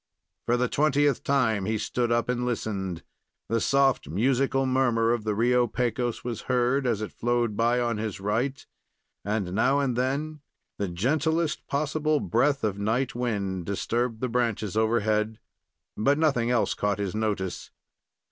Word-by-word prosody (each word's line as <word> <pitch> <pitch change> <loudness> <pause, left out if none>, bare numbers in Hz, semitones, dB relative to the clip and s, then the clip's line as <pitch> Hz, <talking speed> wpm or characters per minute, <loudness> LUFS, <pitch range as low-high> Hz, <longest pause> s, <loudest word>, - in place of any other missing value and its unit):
For 120 - +3
the 125 +1 +1
twentieth 145 +1 +2
time 115 -8 +1
he 110 +2 0
stood 120 +2 -1
up 120 0 +1
and 125 0 -1
listened. 100 -7 -3 0.5
The 115 -1 +1
soft, 135 - +2
musical 135 - +1
murmur 120 -3 +2
of 115 -3 -3
the 105 -1 0
Rio 120 +2 +3
Pecos 120 0 -2
was 120 -2 -4
heard, 125 +2 +2
as 110 -3 0
it 105 - -5
flowed 120 -2 0
by 120 +3 +2
on 120 -3 -1
his 110 -3 -4
right, 115 +7 -1 0.6
and 105 -3 -2
now 135 +7 +3
and 135 -4 0
then 140 +5 -1 0.4
the 100 - 0
gentlest 150 - 0
possible 150 +1 0
breath 135 +8 +1
of 100 -2 -1
night 115 +6 0
wind 100 -7 -2
disturbed 115 +3 -1
the 130 - 0
branches 115 -4 -1
overhead; 110 -1 +1 0.6
but 140 +7 +2
nothing 135 -7 +2
else 120 -2 +2
caught 105 -1 -1
his 100 -3 -3
notice. 105 -4 -2
120 Hz, 155 wpm, -26 LUFS, 105-130 Hz, 0.6 s, For